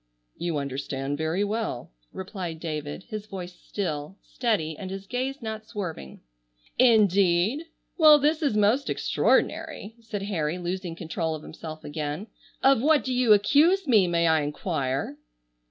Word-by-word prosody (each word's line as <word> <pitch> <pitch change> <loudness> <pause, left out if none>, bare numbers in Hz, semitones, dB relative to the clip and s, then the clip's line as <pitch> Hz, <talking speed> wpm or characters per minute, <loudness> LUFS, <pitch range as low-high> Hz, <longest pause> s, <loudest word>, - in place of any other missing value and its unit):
"You 170 -3 -2
understand 140 0 -3
very 160 +5 0
well," 210 - -3 0.2
replied 185 -4 -6
David, 155 0 -5
his 215 -1 -6
voice 185 -3 -7
still, 175 -2 -5
steady 200 -11 -1
and 185 +4 -7
his 195 +1 -6
gaze 255 +4 -3
not 220 -1 -5
swerving. 175 - -6 0.6
"Indeed! 205 - +4 0.3
Well, 305 -2 +9
this 300 +3 +1
is 280 -9 +1
most 215 +7 +3
extraordinary," 205 +3 0
said 215 -3 -5
Harry, 170 -5 -1
losing 180 -1 -4
control 160 -1 -3
of 155 - -9
himself 155 0 -9
again. 150 +4 -4 0.4
"Of 270 -3 +5
what 300 -2 +4
do 260 - -2
you 250 -3 +3
accuse 305 - +4
me, 215 -8 +5
may 170 -1 +2
I 160 -1 +4
enquire?" 145 -2 -2
190 Hz, 140 wpm, -26 LUFS, 160-225 Hz, 0.6 s, Well